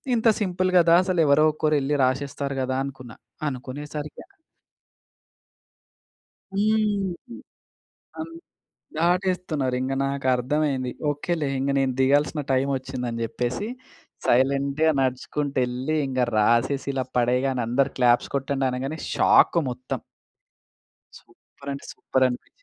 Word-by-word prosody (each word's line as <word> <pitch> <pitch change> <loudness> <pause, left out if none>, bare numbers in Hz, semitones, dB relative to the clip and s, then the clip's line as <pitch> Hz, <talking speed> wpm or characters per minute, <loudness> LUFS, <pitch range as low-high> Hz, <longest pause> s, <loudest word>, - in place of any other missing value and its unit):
"ఇంత 230 0 +1
సింపుల్ 185 -1 0
గదా! 170 0 +5
అసలు 185 -2 -1
ఎవరో 145 +2 +5
ఒకరు 155 0 +1
ఎళ్ళి 145 +2 0
రాసేస్తారు" 140 +1 -2
గదా 130 0 -1
అనుకున్నా. 130 -4 -9 0.3
అనుకునేసరికి 145 +3 -6 2.3
హ్మ్. 210 +1 0 0.8
అన్ 320 +1 -6 0.7
దాటేస్తున్నారు 175 -6 0
ఇంగ 130 +1 -2
నాకు 135 -1 -2
అర్థమైంది. 130 0 -1 0.2
ఓకేలే 150 +1 -2
ఇంగ 135 +1 0
నేను 135 -1 +1
దిగాల్సిన 145 +3 +2
టైమ్ 130 +1 +1
ఒచ్చింది 130 -1 -5
అని 115 0 -4
చెప్పేసి 125 - -3 0.6
సైలెంట్‌గా 140 +4 +2
నడుచుకుంట 135 +2 -2
ఎళ్ళి 130 +5 -2
ఇంగ 130 -1 -2 0.2
రాసేసి 120 +6 +2
ఇలా 130 -1 -1
పడేయగానే 125 +2 +1
అందరు 135 +4 +1
క్లాప్స్ 120 -1 +3
కొట్టండి 135 0 -1
అనగానే 135 +5 -4 0.2
షాక్ - - +5
మొత్తం. 125 +1 -5 1.2
సూపర్ 140 0 -14
అంటే 140 - -8
సూపర్ 130 - 0
అనిపించింది. 125 -1 -5
140 Hz, 110 wpm, -24 LUFS, 130-155 Hz, 2.3 s, గదా